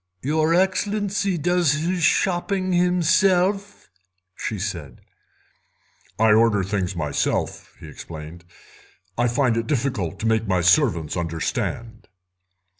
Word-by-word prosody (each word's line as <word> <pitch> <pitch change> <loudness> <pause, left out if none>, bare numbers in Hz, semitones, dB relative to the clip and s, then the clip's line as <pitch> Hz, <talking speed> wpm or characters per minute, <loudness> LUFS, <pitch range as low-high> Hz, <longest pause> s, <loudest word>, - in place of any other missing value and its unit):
"Your 155 +4 +1
Excellency 200 +1 0
does 175 -1 +2
his 175 +4 -1
shopping 185 +3 +1
himself?" 180 +3 +1 0.5
she 110 - -4
said. 85 - -6 1.2
"I 110 0 +4
order 110 -3 +3
the - - -6
things 95 -2 -2
myself," 75 -4 -2
he - - -11
explained; 80 +1 -10 0.7
"I 120 +1 +1
find 120 -1 +1
it 115 0 -2
difficult 120 - -2
to - - -3
make 110 0 +1
my 95 -2 +1
servants 90 - +2
understand." 90 +7 -4
125 Hz, 115 wpm, -22 LUFS, -, 1.2 s, I